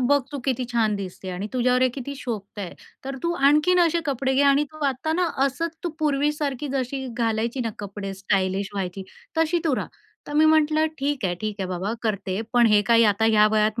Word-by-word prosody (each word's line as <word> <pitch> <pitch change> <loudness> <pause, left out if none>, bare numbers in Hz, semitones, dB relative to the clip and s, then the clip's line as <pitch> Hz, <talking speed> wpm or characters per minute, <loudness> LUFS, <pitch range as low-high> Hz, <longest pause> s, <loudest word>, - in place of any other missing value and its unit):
"बघ 285 +3 +3
तू 285 - -3
किती 260 -2 0
छान 220 -3 +2
दिसते 190 -1 -7
आणि 185 +3 -4
तुझ्यावर 250 0 +2
हे 255 - +5
किती 280 +1 -5
शोभत 220 -6 -6
आहे. 190 -4 -5 0.3
तर 270 0 -4
तू 340 - 0 0.2
आणखीन 305 +5 +4
असे 335 +1 0
कपडे 265 -1 0
घे 275 - +4
आणि 280 +1 +4
तू 310 -1 -5
आता 275 +4 -1
ना 350 +1 +1 0.2
असंच 330 +5 -2
तू 345 - +1
पूर्वीसारखी 295 -2 0
जशी 265 0 -2
घालायची 230 +2 -1
ना 230 -2 -1
कपडे, 200 -1 -6
स्टायलिश 195 0 0
व्हायची, 195 -1 -3 0.4
तशी 325 +2 +2
तू 310 -5 +2
रहा." - - -2 0.4
तर - - -7
मी 305 +1 +4
म्हटलं, 310 0 +4
"ठीक 280 -3 -1
आहे, 180 -2 0
ठीक 215 -1 -3
आहे 190 - -2
बाबा 185 +3 -2
करते. 200 -3 -2
पण 240 -1 +5
हे 210 -2 +5
काही 230 +1 +4
आता 210 +1 +2
ह्या 210 -1 +5
वयात 215 +1 +2
250 Hz, 210 wpm, -24 LUFS, 210-290 Hz, 0.4 s, हे